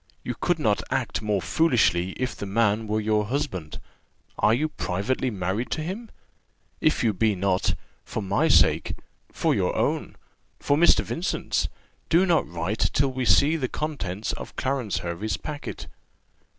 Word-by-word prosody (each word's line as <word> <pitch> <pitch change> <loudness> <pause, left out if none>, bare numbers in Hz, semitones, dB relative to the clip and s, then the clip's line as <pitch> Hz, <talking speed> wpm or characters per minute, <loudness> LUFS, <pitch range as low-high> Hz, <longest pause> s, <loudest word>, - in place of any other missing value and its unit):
You 125 - -3
could 175 +8 0
not 110 -9 +1
act - - -1
more 105 -4 0
foolishly 95 - +2
if 130 -3 -3
the 100 - -6
man 110 +1 +1
were 105 +1 0
your 105 0 +1
husband. 115 - -3 0.6
Are - - +4
you 135 +7 +2
privately 100 +7 -1
married 100 +3 -2
to 155 - -3
him? 205 +8 -5 0.7
If 155 - +2
you 110 -3 +3
be 105 +2 +2
not 95 0 +1 0.3
for 110 - -4
my 100 +1 +2
sake - - +4 0.4
for - - +1
your - - 0
own - - -1 0.4
for 145 - +2
Mr. 170 +4 +5
Vincent's 175 +5 -1 0.4
do 175 +3 +5
not 170 -4 +2
write 85 +6 -3
till 135 0 +2
we 130 -1 -2
see 145 +6 +5
the 140 -5 -1
contents 110 -10 -3
of - - -8
Clarence 130 -6 -1
Hervey's 90 +3 -2
packet." 145 - -6
110 Hz, 155 wpm, -25 LUFS, 100-145 Hz, 0.7 s, Mr